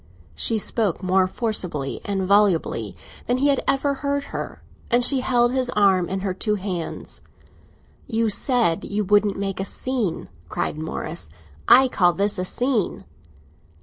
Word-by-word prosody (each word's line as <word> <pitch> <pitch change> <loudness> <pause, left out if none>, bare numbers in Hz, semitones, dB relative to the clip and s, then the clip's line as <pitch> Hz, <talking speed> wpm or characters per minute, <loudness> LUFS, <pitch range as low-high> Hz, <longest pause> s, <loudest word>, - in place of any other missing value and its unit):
She 220 - 0
spoke 210 -3 -1
more 185 0 +3
forcibly 180 - -3
and 195 -1 -2
volubly 200 -4 +2 0.3
than 245 - +1
he 280 +3 +2
had 275 - +1
ever 280 +1 +2
heard 280 0 -2
her, - - -6 0.3
and 240 +1 +4
she 270 0 +4
held 240 -1 +2
his 255 -1 0
arm 190 -4 +3
in 190 0 -2
her 190 -1 -2
two 210 +3 -1
hands. 185 -4 -5 0.9
"You 230 -1 0
said 220 - +1
you 210 +1 -2
wouldn't 205 0 +2
make 195 -1 -3
a - - 0
scene!" 225 -3 -2 0.2
cried - - -2
Morris. 155 - -5 0.4
"I 265 +1 +7
call 180 -8 +3
this 200 +1 0
a 185 - -1
scene." 235 - -1
205 Hz, 150 wpm, -23 LUFS, 185-245 Hz, 0.9 s, I